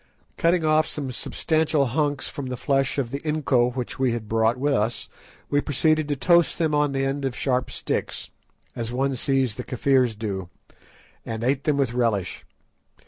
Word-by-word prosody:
Cutting 170 -1 +2
off 155 0 +3
some 140 -3 -4
substantial 155 +3 0
hunks 145 +2 0
from 140 -2 -6
the 125 -1 -4
flesh 135 +1 0
of 125 -4 -1
the 140 - -3
inco 140 -6 +1
which 125 -1 -4
we 130 -3 +2
had 115 -2 -4
brought 110 +2 +2
with 140 +2 +1
us, 115 -1 0 0.4
we 145 0 +3
proceeded 155 +2 +1
to 145 - 0
toast 170 +4 +3
them 160 -3 +1
on 150 -1 +2
the 135 0 0
end 135 +1 -2
of 135 -2 -2
sharp 125 -1 0
sticks, - - -3 0.4
as 115 -1 -3
one 135 +2 0
sees 130 -2 +1
the 125 - -6
Kafirs 125 -2 +2
do, 95 -5 -4 0.7
and 115 0 -5
ate 130 +2 0
them 150 -2 +2
with 135 -4 +1
relish. 115 -7 -1
135 Hz, 180 wpm, -24 LUFS, 120-145 Hz, 0.7 s, off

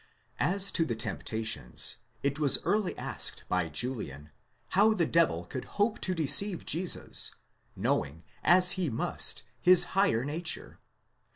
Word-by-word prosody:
§ - - -30 0.4
As 195 +2 +4
to 165 - +1
the 120 -7 -4
temptations, 110 - -1 0.3
it 140 +1 -2
was 145 -3 +4
early 210 -3 -2
asked - - +4
by - - -1
Julian, 75 - -4 0.4
how 215 +3 +2
the 170 - 0
devil 155 - 0
could 125 +8 -8
hope 210 +2 0
to 185 - -1
deceive 175 +4 +2
Jesus, 175 +2 -1 0.4
knowing, 80 +4 -3 0.2
as 180 +1 +4
he 185 -5 -2
must, 115 - -1 0.2
his 180 -1 +6
higher 190 - +1
nature?? 160 +3 -5
165 Hz, 135 wpm, -28 LUFS, 115-185 Hz, 0.4 s, his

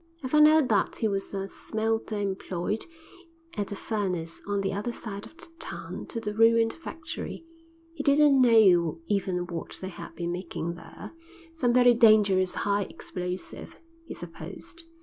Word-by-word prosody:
I - - -2
found 300 +2 +7
out 310 -3 +5
that 205 -3 +2
he 220 - 0
was 195 -2 -2
a 195 -1 -3
smelter 220 +1 -2
employed 195 0 -2 0.7
at 205 -1 -3
a - - -3
furnace 185 -6 -3
on 200 -1 0
the 195 0 -1
other 205 +5 -2
side 205 -3 -7
of 325 - -20
the 345 - -11
town - - -5
to 230 - -4
the 210 -2 -4
ruined 225 +1 +4
factory; 330 0 -7 0.5
he - - -5
didn't 280 -1 +5
know 185 -9 +5
even 185 -3 -1
what 170 -2 -6
they 190 - -5
had 185 - -10
been 170 0 -3
making 170 -1 -4
there; 165 - -11 0.4
some 255 -7 +1
very 245 0 +6
dangerous 210 -5 +4
high 205 0 +1
explosive, 180 0 -6 0.3
he - - -6
supposed. 335 -1 -9
205 Hz, 160 wpm, -27 LUFS, 185-235 Hz, 0.7 s, found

